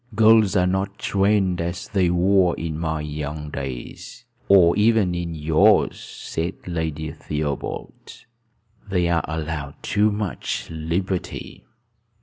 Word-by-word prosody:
"Girls 110 -2 +5
are 90 -2 +4
not 95 +2 -1
trained 95 -3 +1
as 85 +1 -4
they 95 -4 +1
were 90 0 +3
in 80 -1 -4
my 80 -2 -2
young 75 0 -5
days, 65 -4 -7 0.2
or 90 -4 +6
even 105 -3 +3
in 85 -1 -3
yours," 80 0 +3
said 85 +3 -5
Lady 80 -3 -3
Theobald. 75 +8 -5 0.6
"They 90 -3 +1
are 85 -1 +1
allowed 75 -3 -4
too 105 +1 +2
much 100 -7 -3
liberty. 85 +4 -4
85 Hz, 120 wpm, -23 LUFS, 80-95 Hz, 0.6 s, or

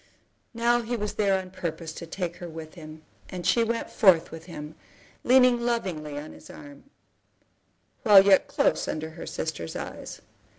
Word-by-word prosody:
Now 240 +1 +2
he 235 +1 -3
was 210 -1 -3
there 200 -2 +2
on 185 -1 -9
purpose 165 -3 -5
to 170 - -8
take 175 0 -4
her 175 - -8
with 160 -1 -9
him, 155 -2 -11 0.3
and 180 -2 -6
she 210 +6 +3
went 230 0 -2
forth 180 -7 +4
with 165 0 -9
him, 150 -3 -8 0.5
leaning 250 -1 +5
lovingly 180 -11 -2
on 150 +2 -7
his - - -14
arm, 145 - -12 1.2
while 200 -2 +8
yet 195 -2 +5
close - - +1
under 160 +1 -4
her 165 - -9
sister's 120 - -4
eyes. - - -7
180 Hz, 165 wpm, -26 LUFS, 160-215 Hz, 1.2 s, while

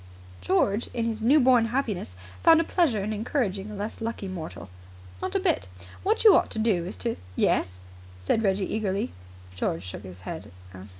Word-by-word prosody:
George, 200 - +1
in 230 -1 0
his 225 -1 -2
new 270 +7 +5
born 250 -3 +5
happiness, 225 - -2 0.3
found 325 -1 +7
a - - +3
pleasure 295 - +1
in 215 +2 -2
encouraging 210 -3 -2
a 210 - -7
less 205 +3 -5
lucky 225 -3 -3
mortal. 165 - -7 0.5
"Not - - -3
a - - +4
bit. 90 - +1 0.3
What 435 +4 +1
you 435 - +9
ought - - +3
to - - -7
do 205 -6 +1
is 190 - -6
to 230 - 0
" 90 - -19 0.2
"Yes?" 90 0 -1 0.4
said 90 - +1
Reggie 195 -2 0
eagerly. 200 - -1 0.4
George 85 -1 -2
shook 90 +1 -7
his 95 -2 -11
head. - - -7
210 Hz, 185 wpm, -26 LUFS, 180-235 Hz, 0.5 s, you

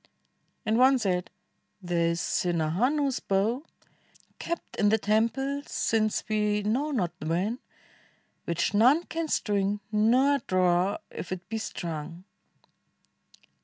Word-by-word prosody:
And 220 +2 +2
one 265 +1 +6
said, 185 -6 -1 0.5
"There 175 -3 0
is 170 0 0
Sinhahanu's 205 - 0
bow. 220 +9 0 0.7
Kept 340 0 -5
in 205 - +3
the 220 - +4
temple 230 +7 0
since 215 -1 0
we 210 -1 0
know 250 +9 0
not 200 - -1
when. 185 +10 -1 0.9
Which 170 +3 -1
none 255 +11 +5
can 330 -1 -4
string, 205 -6 0
nor 250 +7 +3
draw 185 -1 +1
if 180 - -7
it 180 -1 -5
be 225 0 -2
strung." 170 -3 -6
210 Hz, 115 wpm, -27 LUFS, 180-250 Hz, 0.9 s, one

